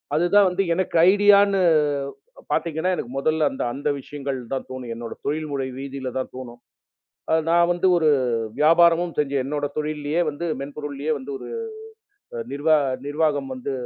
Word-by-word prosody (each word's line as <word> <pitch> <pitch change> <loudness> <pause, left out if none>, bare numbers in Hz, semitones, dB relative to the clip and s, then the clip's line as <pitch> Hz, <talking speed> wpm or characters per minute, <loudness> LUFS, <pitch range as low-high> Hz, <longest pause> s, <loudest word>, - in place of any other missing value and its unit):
அது 170 +3 +2
தான் 200 -2 +7
வந்து 190 +2 0
எனக்கு 185 -1 -2 0.2
ஐடியான்னு 200 -1 +5 0.9
பாத்தீங்கன்னா, 170 +2 0
எனக்கு 125 - -6
மொதல்ல 155 +2 +1
அந்த - - -4
அந்த 145 +1 -2
விஷயங்கள் 140 -1 -5 0.2
தான் 135 - -3
தோணும். 125 -2 -6
என்னோட 115 -1 -6
தொழில்முறை 145 -3 -2
வீதியில 135 -2 -5
தான் - - -5
தோணும். 120 -2 -9 0.9
நான் 170 +1 +4
வந்து 175 +2 +1
ஒரு 160 -2 +3 0.5
வியாபாரமும் 170 +2 +4
செஞ்சு 140 -1 0
என்னோட 145 +1 -2
தொழில்லயே 150 +2 -1
வந்து 150 +4 -5
மென்பொருள்லயே 145 +1 -4
வந்து 140 +1 -8
ஒரு - - -10 1.0
நிர்வா 150 +2 +3 0.3
நிர்வாகம் 145 -2 0
வந்து 130 +2 -5
150 Hz, 140 wpm, -23 LUFS, 140-170 Hz, 1.0 s, தான்